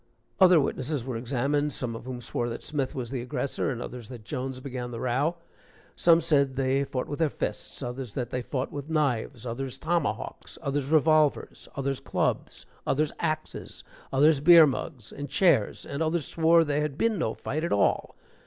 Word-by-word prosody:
Other 180 -3 +7
witnesses 135 -1 -1
were 130 -2 -3
examined, 140 +5 0
some 120 -3 -4
of 115 - -8
whom 125 -1 -5
swore 120 0 -2
that 115 - -6
Smith 140 -4 -2
was 125 -2 -4
the 130 -3 -2
aggressor, 130 +3 -2
and 120 -3 -3
others 125 -2 -8
that 120 -4 -9
Jones 130 +1 -4
began 125 -2 -5
the 115 -1 -6
row; 135 +7 0 0.6
some 170 -1 +5
said 140 -5 +2
they 135 +1 +1
fought 130 -2 -3
with 145 - -5
their 160 -2 +3
fists, 140 - -5
others 125 -2 -5
that 125 -2 -3
they 125 - -1
fought 130 +1 -3
with 145 +1 -6
knives, 130 -5 0
others 125 +2 -4
tomahawks, 165 -1 -2
others 140 -1 -1
revolvers, 155 -1 +2
others 135 -1 -1
clubs, - - -2 0.2
others 150 +2 +1
axes, 155 -2 -4 0.3
others 145 +2 +4
beer 165 +2 +9
mugs 130 -3 -4
and 145 -1 -6
chairs, 140 - +2
and 140 - -4
others 160 -1 0
swore 165 0 +4
there 145 -1 0
had 150 -2 -2
been 225 0 +1
no 110 -9 -1
fight 155 +3 -3
at 170 - -1
all. 100 - +1
140 Hz, 180 wpm, -27 LUFS, 125-155 Hz, 0.6 s, beer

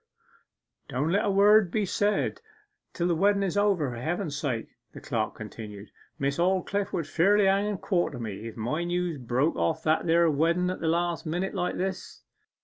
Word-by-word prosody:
'Don't 145 +4 -1
let 200 - +2
a - - +1
word 200 0 +5
be 210 +2 0
said 205 +3 0 0.5
till 175 - -1
the 175 - +2
wedden 200 +4 +2
is 190 -1 -1
over, 195 -9 +2
for 120 - -7
Heaven's 160 - -2
sake,' 130 -6 -3 0.2
the - - -9
clerk - - -2
continued. 105 -2 -9 0.3
'Miss 140 +2 -1
Aldclyffe 190 +2 0
would 170 - -2
fairly 195 +7 +3
hang 195 +2 +3
and 205 -3 -3
quarter 175 -8 0
me, 110 -2 -6
if 115 - -9
my 125 +10 -2
news 175 -3 -2
broke 125 +6 0
off 160 0 -1
that 155 +2 +1
there 170 +1 +4
wedden 170 +5 +1
at 185 - -6
a 165 - -1
last 170 0 0
minute 175 +4 -2
like 180 -3 -2
this. 190 0 -4
170 Hz, 185 wpm, -27 LUFS, 145-195 Hz, 0.5 s, word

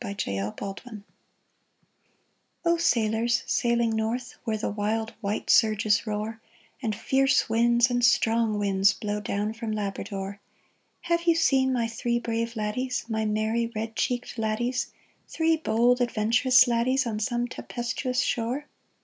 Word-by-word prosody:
THREE 200 - -3 0.2
LADDIES 205 +2 -7 1.6
O 340 0 +4
SAILORS 230 -6 +1
sailing 235 -2 +1
north, 225 +3 -2
Where 220 -1 -1
the 215 - -2
wild 220 +2 -2
white 205 0 -1
surges 215 -1 +3
roar, 215 +1 -4 0.4
And 220 -4 -1
fierce 270 +5 +2
winds 235 +2 +3
and 245 0 0
strong 225 -2 +3
winds 195 -1 +3
Blow 210 +1 -3
down 205 +2 -2
from 225 -1 -5
Labrador 200 -1 -4 0.3
— - - -44
Have 340 0 0
you 335 - +5
seen 265 -5 +3
my 240 -3 0
three 235 +1 -1
brave 230 0 -2
laddies, 235 +4 -2
My 220 -1 -1
merry 220 +2 0
red 225 +1 -4
cheeked 245 -1 -2
laddies, 240 +3 -1 0.4
Three 325 0 +1
bold, 245 -3 +2
adventurous 240 +3 +4
laddies, 250 +3 +1
On 220 -3 -3
some 240 +2 -1
tempestuous 245 +1 -3
shore 245 +5 -1
230 Hz, 135 wpm, -26 LUFS, 215-245 Hz, 1.6 s, you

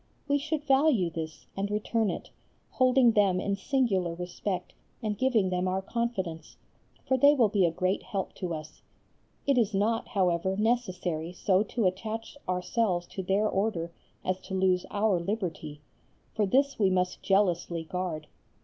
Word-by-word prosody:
We 285 0 +2
should 310 +1 -2
value 270 - +3
this 160 -1 -6
and 200 +1 -2
return 215 +1 0
it, - - -5 0.4
holding 255 -1 +4
them 200 -4 +3
in 200 +1 -1
singular 195 - 0
respect 180 +2 -4 0.3
and 215 -1 -1
giving 220 -5 +2
them 180 0 0
our 190 +1 -1
confidence, 190 -9 -3 0.5
for 260 - +3
they 285 +3 +7
will 235 -6 +4
be 195 -4 +3
a - - 0
great 185 +3 0
help 195 -5 -4
to 180 -2 -3
us. 155 -1 -7 0.6
It 275 -3 +3
is 215 -3 +1
not, 225 +3 +1
however, 190 0 +1
necessary 185 -8 -1
so 185 +1 +2
to 215 +1 -1
attach 220 +6 -2
ourselves 180 0 0
to 190 - -5
their 195 +3 +1
Order 190 -5 -1 0.3
as 185 0 0
to 190 +1 -6
lose 185 -1 +2
our 205 -3 +2
liberty, 170 -6 -4 0.5
for 210 -2 +1
this 275 +6 +2
we 195 -3 +4
must 180 -1 0
jealously 175 -4 +1
guard. 165 -2 -4
195 Hz, 160 wpm, -29 LUFS, 180-225 Hz, 0.6 s, they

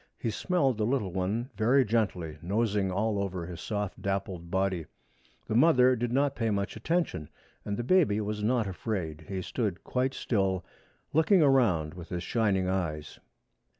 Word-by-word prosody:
He 115 - -2
smelled 135 - 0
the - - +1
little 120 -8 -1
one 105 +8 -2
very 125 +4 +4
gently, 95 -8 -1
nosing 100 0 0
all 100 +2 0
over 95 -3 -3
his 85 -1 -8
soft 105 -2 -3
dappled 95 -3 -3
body. 95 -3 0 0.6
The - - -3
mother 130 -1 +5
did 120 0 -2
not 140 +2 +1
pay 115 -2 0
much 100 -1 -1
attention, 115 - -1 0.3
and 100 0 -3
the 120 - -2
baby 145 - +3
was 105 0 -3
not 115 0 +2
afraid. 85 -4 -4
He 95 -2 -3
stood 105 -6 -2
quite 130 +1 -1
still, 95 -5 0 0.5
looking 160 +3 +5
around 110 - +3
with 90 -1 -10
his 90 0 -3
shining 100 -5 +1
eyes. 80 -5 -3
105 Hz, 160 wpm, -29 LUFS, 95-120 Hz, 0.6 s, mother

